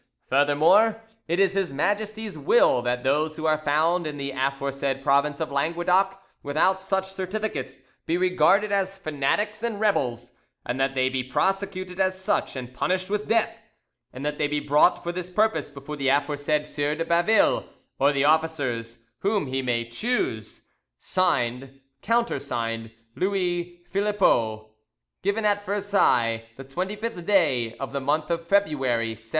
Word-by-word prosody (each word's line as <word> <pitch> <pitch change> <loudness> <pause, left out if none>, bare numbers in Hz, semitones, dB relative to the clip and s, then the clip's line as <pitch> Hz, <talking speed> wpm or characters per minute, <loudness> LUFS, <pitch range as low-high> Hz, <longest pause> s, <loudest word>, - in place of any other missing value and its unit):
Furthermore, 155 +11 +4 0.3
it 170 +3 0
is 195 -1 +3
His 195 -2 -1
Majesty's 210 +7 -2
will 145 - +3
that 125 0 -1
those 150 +4 +1
who 160 - -5
are 155 -1 +2
found 155 +3 +1
in 150 -1 -5
the, 140 0 -3
aforesaid 135 0 -2
province 140 +1 +2
of 160 -3 -3
Languedoc 175 +6 +1 0.2
without 160 +7 +1
such 190 0 -2
certificates 190 -6 -4 0.2
be 165 - +1
regarded 185 +3 +3
as 195 -1 0
fanatics 195 +7 -1
and 230 -3 -2
rebels, 125 - 0 0.3
and 125 +2 -3
that 135 0 0
they 130 0 +2
be 130 -1 -1
prosecuted 185 +6 -2
as 185 0 +1
such, 190 - -1
and 125 -1 -7
punished 185 +8 -1
with 210 0 -1
death, 225 +1 +1 0.6
and 130 +3 -7
that 150 0 -2
they 150 - +2
be 150 0 -1
brought 145 +4 +3
for 175 - -2
this 180 0 -5
purpose 215 +1 +1
before 145 +1 -8
the 135 -1 -1
aforesaid 145 +2 +1
Sieur 145 0 -2
de 165 +1 -2
Baville 175 +6 +3 0.4
or 140 +2 +4
the 140 -1 +1
officers 145 -7 0 0.2
whom 200 -4 0
he 135 0 -2
may 120 -2 -1
choose. 245 - -2 0.3
"(Signed) 135 -7 -1 0.2
"(Countersigned) 120 - -1 0.3
"LOUIS 180 -2 0 0.2
PHILIPPEAU 120 - +1 0.5
"Given 200 +3 0
at 205 -1 +2
Versailles 190 - +1
the 135 - -9
25th 190 +7 -4
day, 140 - +2
of 135 0 -6
the 140 - -2
month 150 +4 0
of 170 0 -2
February 135 - +1
1703." 115 0 -9
155 Hz, 150 wpm, -25 LUFS, 135-195 Hz, 0.6 s, Furthermore